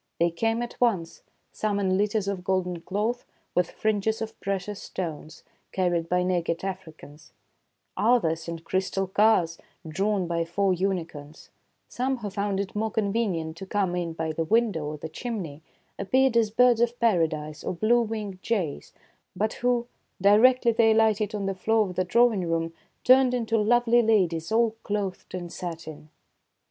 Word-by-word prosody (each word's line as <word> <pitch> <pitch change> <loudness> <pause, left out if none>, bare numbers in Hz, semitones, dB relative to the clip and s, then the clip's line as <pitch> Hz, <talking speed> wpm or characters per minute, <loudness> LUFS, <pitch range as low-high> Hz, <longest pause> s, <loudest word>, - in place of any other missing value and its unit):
They 170 0 +3
came 225 +7 0
at 240 - -9
once, 190 -9 0
— - - -46
some 210 -1 -1
in 190 -2 +1
litters 205 +1 0
of 195 -2 -3
golden 180 -2 -1
cloth, 215 +7 -2 0.3
with 180 -1 +1
fringes 220 +1 -1
of 225 0 -6
precious 195 +1 -3
stones, 160 -3 -6 0.3
carried 175 -3 0
by 180 0 +2
naked 175 -2 -1
Africans; 160 -5 -9 0.6
others 170 -9 +2
in 170 0 -4
crystal 190 +3 -2
cars, 190 -4 +2 0.3
drawn 195 +4 0
by 170 -1 -1
four 190 +3 +1
unicorns; 165 -5 -4 0.4
some, 260 +2 -2
who 210 -4 -6
found 200 0 -1
it 200 -1 -3
more 220 +1 0
convenient 200 -7 -1
to 195 - -8
come 190 -3 0
in 170 -2 -2
by 160 -1 -3
the 165 +1 -2
window 210 -4 +1
or 150 0 -5
the 155 - -6
chimney, 165 - -6 0.4
appeared 260 +5 +2
as 230 -2 +3
birds 240 +1 +4
of 240 0 0
paradise 160 -8 0
or - - -2
blue 230 +6 +3
winged 210 -4 -4
jays, 190 -11 -2 0.4
but 215 +3 0
who, 245 -1 +1 0.3
directly 235 +5 +5
they 225 -1 +4
alighted 220 -1 +2
on 200 -2 -3
the 195 - -1
floor 215 +3 +1
of 180 - -8
the 185 - +1
drawing 210 -2 +2
room, 165 0 -1 0.3
turned 255 0 +5
into 230 -2 -1
lovely 240 +2 +4
ladies 185 -7 +1
all 230 0 +3
clothed 200 -3 -4
in 175 -1 -5
satin. 165 -3 -8
195 Hz, 160 wpm, -26 LUFS, 170-225 Hz, 0.6 s, directly